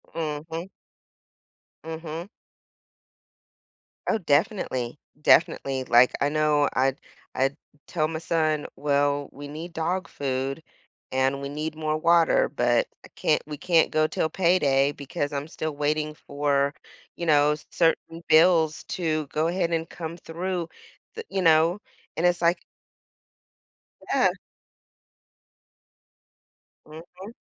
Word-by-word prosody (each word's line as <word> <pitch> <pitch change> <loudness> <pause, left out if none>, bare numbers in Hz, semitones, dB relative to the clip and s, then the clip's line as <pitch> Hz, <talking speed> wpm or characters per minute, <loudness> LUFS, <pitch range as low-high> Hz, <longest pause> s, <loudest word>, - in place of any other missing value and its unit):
Mhm. 160 +2 -4 1.2
Mhm. 160 +2 -6 1.8
Oh, - - +2
definitely. 145 - 0 0.2
Definitely. 135 -4 +3
Like, 125 0 +5
I 145 - +3
know 150 -1 +2
I'd 135 +1 +1 0.4
I'd 135 +3 +1 0.3
tell 155 -3 0
my 160 0 -4
son, 155 -3 0
"Well, 145 0 +1
we 145 +1 -9
need 165 +3 -7
dog 175 +3 -2
food, 135 +2 -3 0.5
and 135 +1 +1
we 140 - -4
need 155 +2 -4
more 155 0 -1
water, 170 0 +4
but 120 -4 +1 0.2
I - - -14
can't - - +1
we 150 -1 -7
can't 170 0 +3
go 155 0 +3
till 160 - -1
payday 145 -6 +2
because 145 +1 -4
I'm 140 +2 -3
still 155 -2 -4
waiting 150 +1 -1
for, 140 -1 0 0.4
you 170 - -3
know, 150 -1 +4
certain 165 0 0
bills 160 -1 +4
to 155 -4 -2
go 155 +3 0
ahead 170 -1 0
and 165 0 -1
come 165 0 -6
through." 175 +1 -4 0.5
Th 455 - -6
You 190 - -1
know? 165 +4 +4 0.3
And 165 - 0
it's 175 -1 +2
like 170 +1 +3 1.5
Yeah. - - +4 2.6
Mhm. 175 +7 -11
155 Hz, 120 wpm, -25 LUFS, 145-165 Hz, 2.6 s, Like